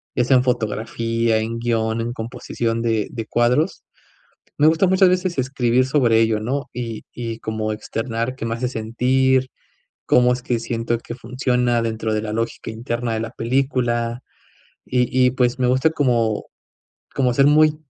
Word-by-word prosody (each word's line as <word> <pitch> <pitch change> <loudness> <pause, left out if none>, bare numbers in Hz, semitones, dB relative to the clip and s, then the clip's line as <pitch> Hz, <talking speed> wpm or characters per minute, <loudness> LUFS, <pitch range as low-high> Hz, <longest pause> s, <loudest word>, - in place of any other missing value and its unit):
ya 125 - +2
sea 130 +1 +4
en 125 - +2
fotografía, 115 -1 0
en 115 +1 -3
guión, 115 -1 0
en 120 +1 -3
composición 115 0 -3
de 110 -2 0
de 115 -2 -5
cuadros. 125 - +1 0.7
Me 150 - +5
gusta 165 +4 +4
muchas 190 0 +5
veces 180 -3 0
escribir 130 -1 +1
sobre 125 -5 +3
ello, 110 -1 +2
¿no? 135 +6 -3
Y 115 -2 -5
y 115 -2 -5
como 110 0 -3
externar, 115 +3 -3
qué 115 - -4
me 115 0 -2
hace 125 +1 -2
sentir, 130 +3 +1 0.6
cómo 125 0 +4
es 125 - -7
que 120 -2 -1
siento 115 0 -2
que 120 - -8
funciona, 125 -1 0
dentro 110 -1 -2
de 110 - 0
la 105 -1 -4
lógica 115 0 -3
interna 120 +1 -3
de 110 - -2
la 115 0 -4
película. 120 -1 -1 0.6
Y 125 -1 +1 0.2
y, - - +4
pues, 125 0 0
me 125 - +3
gusta 130 +5 +3
como 120 -8 0 0.7
como 125 -3 +1
ser 140 - +4
muy, 155 +1 +5
120 Hz, 170 wpm, -21 LUFS, 115-130 Hz, 0.7 s, Me